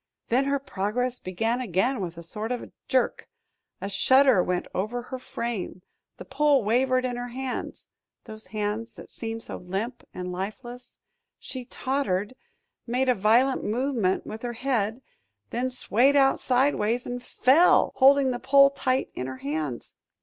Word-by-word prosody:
Then 255 +4 +2
her 280 0 +1
progress 245 +1 -2
began 225 +7 -1
again 235 +4 0
with 170 -2 -5
a 170 - -8
sort 215 +7 -5
of 245 - -4 0.2
jerk. 255 -2 0 0.5
A - - -3
shudder 260 +3 +5
went 180 0 -1
over 225 +6 -2
her 255 +1 -7
frame, 230 -7 -5 0.3
the - - -9
pole 280 -1 +2
wavered 255 +4 +2
in 245 -1 -2
her 245 0 -4
hands 255 +1 -5 0.4
those 215 -3 -10
hands 215 +3 -3
that - - -12
seemed 225 0 -5
so - - -6
limp 200 +7 -4
and 180 0 -5
lifeless 240 +7 -7 0.4
she 255 -2 -7
tottered, 240 -6 -2 0.5
made 255 +2 +1
a - - +6
violent 235 +6 +3
movement 230 -4 0
with 220 +1 -7
her 240 -1 -4
head, 235 -1 -1 0.5
then 250 +2 -1
swayed 255 +2 +2
out 270 -1 +4
sidewise 245 -3 +1
and 245 0 -4
fell 270 +7 +4
holding 270 0 +5
the 245 - -3
pole 275 +1 +6
tight 260 -1 -1
in 130 - -4
her 130 0 -6
hands! 145 -3 -4
240 Hz, 155 wpm, -26 LUFS, 205-260 Hz, 0.5 s, a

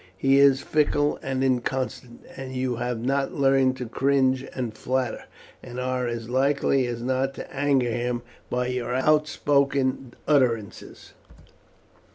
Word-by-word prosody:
He 135 +5 +4
is 140 -1 +5
fickle 150 -1 +1
and 135 0 -2
inconstant, 130 -1 -2
and 130 -1 -7
you 130 -2 -1
have 120 -1 -2
not 135 +1 0
learned 135 -2 +3
to 125 - -4
cringe 130 +1 +1
and 120 -4 -3
flatter, 130 +2 -2 0.4
and 125 0 -8
are 125 -1 -1
as 115 -1 -4
likely 135 0 +1
as 120 -1 -4
not 130 +2 -1
to - - -9
anger 135 -3 +2
him 120 +1 -2 0.3
by 125 0 -1
your 125 -1 -2
outspoken 140 -3 +1
utterances." 120 -8 0
130 Hz, 135 wpm, -25 LUFS, 125-135 Hz, 0.4 s, is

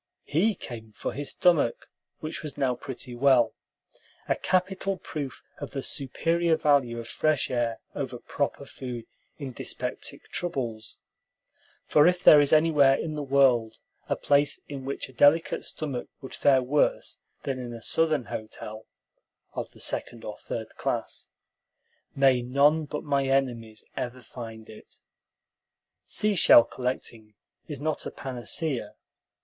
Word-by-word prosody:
He 195 +9 +2
came 110 -8 -9
for - - -4
his 145 +1 -4
stomach, 165 -10 +2 0.3
which 155 +1 -4
was 150 -2 -7
now 130 -2 +2
pretty 125 0 -7
well, 120 -2 +4 0.7
a - - +2
capital 190 +1 0
proof 145 -7 -6 0.2
of 145 - -7
the 135 -2 -3
superior 165 +5 0
value 140 -5 +2
of 115 -1 -6
fresh 155 -3 +1
air 120 -2 0 0.2
over - - -4
"proper" - - -3
food 125 -3 -7 0.3
in 140 -3 -6
dyspeptic - - -5
troubles; 120 - -3 0.8
for 150 +2 +5
if 180 0 +2
there 150 - +9
is 145 - +1
anywhere 155 -4 +5
in 155 +2 -3
the 150 - -3
world 130 -5 +3 0.3
a - - +2
place 145 0 +2
in 135 -2 -7
which 140 - -3
a 130 - -16
delicate 145 +5 +4
stomach 140 -6 -2
would 130 - -9
fare 135 -2 +4
worse 140 +4 0 0.2
than 135 -2 -2
in 125 -1 -6
a 115 - -7
Southern 155 +1 +1
hotel, 110 0 -7 0.7
of - - -4
the - - -17
second 115 -1 -3
or 105 - -5
third 110 -1 -6
class, - - -3 0.9
may 135 -2 +4
none 145 +5 +3
but 150 +1 -5
my 140 -2 +1
enemies 120 -5 -1
ever 125 0 -4
find 115 -2 -9
it. 110 - -13 1.1
Seashell 200 - +6
collecting 115 -4 -5 0.3
is 145 -4 -5
not 155 +1 -1
a - - -3
panacea. 130 -1 -3
135 Hz, 140 wpm, -27 LUFS, 120-150 Hz, 1.1 s, there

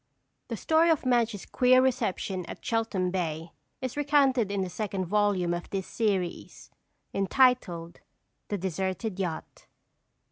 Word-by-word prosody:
The - - -4
story 325 +1 +3
of 315 -4 +2
Madge's 235 -5 +1
queer 255 0 +4
reception 225 -7 0
at - - -9
Cheltham 220 -6 0
Bay 165 -3 -3 0.3
is 255 -1 -3
recounted 275 -6 +3
in 200 -1 -1
the 190 - -1
second 190 0 -3
volume 195 -2 +1
of 175 0 -5
this 195 -1 -3
series, 195 -6 -2 0.4
entitled: 195 -6 +2 0.5
"The 205 - -2
Deserted 190 +3 -3
Yacht." 175 -4 -5
200 Hz, 130 wpm, -28 LUFS, 185-250 Hz, 0.5 s, queer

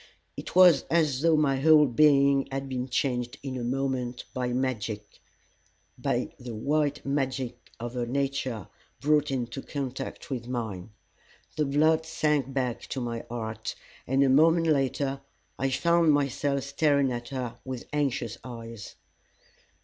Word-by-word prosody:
It - - -8
was 180 -6 +8
as 155 -6 +2
though 165 -1 +4
my 140 -3 +2
whole 155 +1 +6
being 140 +1 +4
had 135 0 -3
been 130 -1 -3
changed 125 -1 -1
in 135 -2 -4
a 125 - -3
moment 125 -1 -2
by 125 -1 -1
magic 115 -5 -3 0.8
by - - -2
the 120 -2 -7
white 145 +4 0
magic 135 -3 -2
of 120 +1 -5
her 120 -1 -2
nature 135 -4 -2 0.3
brought 150 +1 +2
into 130 -1 -3
contact 135 -1 -5
with 120 -3 -3
mine. 110 -7 -4 0.7
The 150 - +1
blood 155 +3 +2
sank 150 -4 0
back 130 -3 -1
to 135 - -4
my 120 -2 -3
heart, 110 -2 -4 0.3
and 135 +2 +3
a 135 - +3
moment 165 +5 +5
later 135 -2 0 0.4
I 135 - +1
found 170 +4 +3
myself 140 -1 0
staring 140 -1 +2
at 120 0 -5
her 125 -3 -5
with 130 -2 -6
anxious 125 -6 -1
eyes. 115 -3 -8
135 Hz, 140 wpm, -27 LUFS, 120-145 Hz, 0.8 s, was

